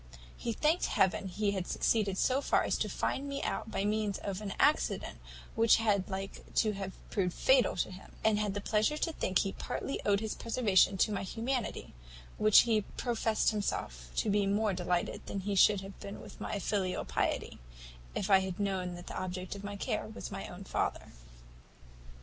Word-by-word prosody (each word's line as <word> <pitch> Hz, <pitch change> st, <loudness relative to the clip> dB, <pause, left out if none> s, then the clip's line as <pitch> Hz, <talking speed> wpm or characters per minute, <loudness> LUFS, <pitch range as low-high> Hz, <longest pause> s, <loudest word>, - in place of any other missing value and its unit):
He 235 Hz, -, -3 dB
thanked 305 Hz, +9 st, +2 dB
Heaven 190 Hz, 0 st, +2 dB
he 200 Hz, +2 st, 0 dB
had 190 Hz, -3 st, -3 dB
succeeded 205 Hz, -4 st, +1 dB
so 260 Hz, +6 st, +2 dB
far -, -, +2 dB
as -, -, 0 dB
to -, -, 0 dB
find 280 Hz, +1 st, -2 dB
me 280 Hz, 0 st, -3 dB
out -, -, -2 dB
by 200 Hz, -, -1 dB
means 210 Hz, -1 st, 0 dB
of 200 Hz, 0 st, -4 dB
an 205 Hz, -2 st, -4 dB
accident -, -, +2 dB, 0.3 s
which 225 Hz, 0 st, +5 dB
had 205 Hz, -4 st, +1 dB
like 195 Hz, 0 st, -5 dB
to 215 Hz, -, +3 dB
have 195 Hz, -2 st, -5 dB, 0.2 s
proved 180 Hz, -3 st, 0 dB
fatal 260 Hz, -2 st, +4 dB
to 180 Hz, -, -1 dB
him; 185 Hz, +1 st, -12 dB
and 215 Hz, -1 st, +3 dB
had 205 Hz, -2 st, -1 dB
the 205 Hz, -, -2 dB
pleasure 215 Hz, +9 st, +1 dB
to 330 Hz, +1 st, -1 dB
think 185 Hz, -10 st, 0 dB
he 195 Hz, -, +1 dB
partly 275 Hz, -, -4 dB
owed 200 Hz, -1 st, +3 dB
his 220 Hz, 0 st, -3 dB
preservation 210 Hz, -5 st, +3 dB
to 215 Hz, -, +3 dB
my 200 Hz, -, -1 dB
humanity, 235 Hz, +5 st, -3 dB, 0.5 s
with -, -, -1 dB
which 215 Hz, -, +9 dB
he 225 Hz, -3 st, +2 dB
profest 225 Hz, +1 st, 0 dB
himself 210 Hz, -2 st, -3 dB
to 215 Hz, -, +1 dB
be 205 Hz, -1 st, +2 dB
more 205 Hz, +1 st, +2 dB
delighted 180 Hz, -1 st, -1 dB
than 195 Hz, -, -3 dB
he 200 Hz, +2 st, -2 dB
should 200 Hz, +1 st, +5 dB
have 195 Hz, 0 st, -10 dB
been 200 Hz, -, -7 dB
with -, -, -12 dB
my -, -, -2 dB
filial 190 Hz, -1 st, -1 dB
piety, -, -, -1 dB, 0.6 s
if 195 Hz, -, -1 dB
I 190 Hz, -, +8 dB
had 190 Hz, -1 st, -4 dB
known 190 Hz, -3 st, -1 dB
that 175 Hz, 0 st, -9 dB
the -, -, -5 dB
object 185 Hz, 0 st, -4 dB
of 200 Hz, -, -8 dB
all -, -, -4 dB
my 205 Hz, -, -5 dB
care 200 Hz, -, -2 dB
was -, -, -7 dB
my -, -, -5 dB
own -, -, -9 dB
father. -, -, -2 dB
200 Hz, 200 wpm, -32 LUFS, 190-220 Hz, 0.6 s, which